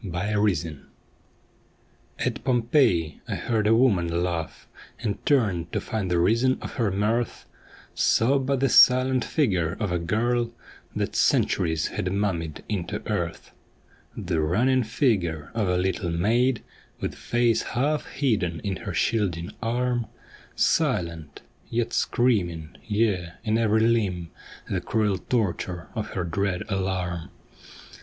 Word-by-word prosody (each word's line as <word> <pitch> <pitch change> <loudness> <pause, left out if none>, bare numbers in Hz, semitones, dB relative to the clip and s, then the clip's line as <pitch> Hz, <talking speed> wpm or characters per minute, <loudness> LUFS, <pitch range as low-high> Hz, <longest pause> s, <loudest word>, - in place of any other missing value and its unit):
AT 95 - -6
POMPEII 90 -5 -1 1.3
At - - -2
Pompeii 120 - +2
I - - -2
heard 110 -3 0
a 110 - +5
woman 90 -9 +2
laugh, 85 -3 -4 0.3
And 110 -3 -3
turned 95 - +2
to - - +1
find 105 -4 -3
the 90 - +2
reason 115 +9 +3
of - - -7
her 115 -4 +2
mirth, 105 +4 -1 0.5
Saw 135 +5 +3
but 135 0 -1
tlie 135 -3 +2
silent 130 0 +6
figure 90 - 0
of 105 -4 -1
a 90 - 0
girl 115 +6 0 0.4
That - - -2
centuries 80 -4 +2
had 90 - -3
mummied 90 -6 -2
into 100 -5 -4
earth: - - -3 0.7
The 90 -6 -1
running 120 +12 +2
figure 95 - 0
of 110 -4 0
a 90 - +2
little 90 -1 -1
maid 115 +8 +1 0.4
With - - -3
face 120 -2 +1
half 145 +4 -1
hidden 100 - 0
in 95 -3 -2
her - - -6
shielding 95 -6 0
arm, 120 0 0 0.5
Silent, 85 -4 0 0.3
yet 120 0 -1
screaming, 90 -10 0
yea, 105 -6 0
in 110 -1 0
ev'ry 110 -1 +3
limb, 100 -8 +1 0.4
The - - -2
cruel 105 -4 0
torture 90 -6 -2
of 110 -3 -4
her 90 - -1
dread 90 +2 -1
alarm. 95 -3 -2
105 Hz, 130 wpm, -25 LUFS, 85-120 Hz, 1.3 s, silent